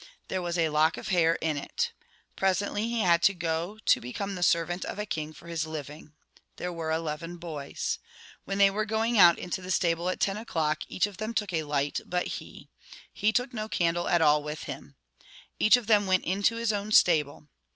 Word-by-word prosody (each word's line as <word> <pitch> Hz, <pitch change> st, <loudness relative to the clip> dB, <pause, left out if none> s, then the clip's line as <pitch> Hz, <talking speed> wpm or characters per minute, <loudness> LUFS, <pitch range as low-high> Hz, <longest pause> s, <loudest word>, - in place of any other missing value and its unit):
There 185 Hz, -, -1 dB
was 175 Hz, 0 st, -2 dB
a 165 Hz, -2 st, +2 dB
lock 155 Hz, +2 st, +2 dB
of -, -, -6 dB
hair 165 Hz, -3 st, +3 dB
in 155 Hz, -2 st, 0 dB
it. 475 Hz, -, -3 dB, 0.4 s
Presently 205 Hz, +3 st, 0 dB
he 235 Hz, -1 st, 0 dB
had 170 Hz, -3 st, +4 dB
to 195 Hz, +2 st, +4 dB
go 170 Hz, +4 st, -2 dB
to -, -, +4 dB
become 195 Hz, -, -4 dB
the 180 Hz, -, -6 dB
servant 175 Hz, +1 st, +1 dB
of -, -, -5 dB
a 210 Hz, -, -3 dB
king 155 Hz, -6 st, -4 dB
for 155 Hz, -, -15 dB
his 165 Hz, -2 st, -2 dB
living. 150 Hz, 0 st, -8 dB, 0.4 s
There 180 Hz, 0 st, -4 dB
were 165 Hz, -1 st, -4 dB
eleven 165 Hz, +2 st, -3 dB
boys. 155 Hz, -5 st, -4 dB, 0.4 s
When 195 Hz, -, -3 dB
they 200 Hz, -1 st, +6 dB
were 215 Hz, +2 st, -1 dB
going 220 Hz, +1 st, +1 dB
out 175 Hz, -2 st, +8 dB
into 180 Hz, +1 st, -4 dB
the 180 Hz, -, -9 dB
stable 175 Hz, -1 st, +1 dB
at 185 Hz, -, -3 dB
ten 195 Hz, +1 st, 0 dB
o'clock, 160 Hz, -8 st, -1 dB
each 185 Hz, -, +1 dB
of 205 Hz, -3 st, -8 dB
them 215 Hz, +3 st, -4 dB
took 205 Hz, -5 st, -1 dB
a 160 Hz, -, +1 dB
light 145 Hz, -1 st, -1 dB
but 180 Hz, 0 st, -2 dB
he. -, -, -8 dB, 0.5 s
He 210 Hz, +2 st, +1 dB
took 245 Hz, +3 st, -1 dB
no 215 Hz, -1 st, -4 dB
candle 175 Hz, -2 st, 0 dB
at 170 Hz, -2 st, +3 dB
all 150 Hz, -1 st, +5 dB
with 150 Hz, +1 st, -6 dB
him. -, -, -8 dB, 0.6 s
Each 215 Hz, +3 st, +6 dB
of 245 Hz, -, -6 dB
them 205 Hz, -2 st, +3 dB
went 185 Hz, -1 st, +2 dB
into 200 Hz, +5 st, +1 dB
his 230 Hz, -1 st, 0 dB
own 205 Hz, +1 st, -3 dB
stable. 150 Hz, -6 st, +3 dB
175 Hz, 210 wpm, -28 LUFS, 160-205 Hz, 0.6 s, out